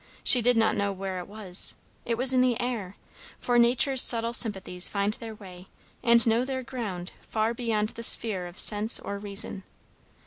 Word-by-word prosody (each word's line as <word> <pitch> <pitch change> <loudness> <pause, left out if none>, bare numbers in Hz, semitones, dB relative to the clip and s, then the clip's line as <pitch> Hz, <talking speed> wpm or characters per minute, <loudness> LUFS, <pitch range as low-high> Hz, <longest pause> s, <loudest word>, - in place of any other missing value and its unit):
She 250 - +5
did 245 +1 +1
not 225 -1 +1
know 200 0 -2
where 190 -1 -6
it 180 - -9
was; 200 -3 -2 0.3
it 230 -1 -2
was 255 +2 0
in 255 - +2
the 250 -2 0
air; 225 -6 -5 0.4
for 245 -1 0
nature's 250 +2 +3
subtle 230 0 +2
sympathies 190 -6 -1
find 200 +1 -2
their 225 0 -9
way 185 -3 -14 0.3
and 235 -1 +4
know 230 +1 +1
their 260 0 -5
ground 205 -8 -7 0.2
far 220 +1 -2
beyond 225 -3 -2
the 230 - -10
sphere 210 -5 0
of 175 - -14
sense 210 +1 +7
or 200 0 -7
reason. 200 -1 -4
220 Hz, 180 wpm, -25 LUFS, 200-240 Hz, 0.4 s, sense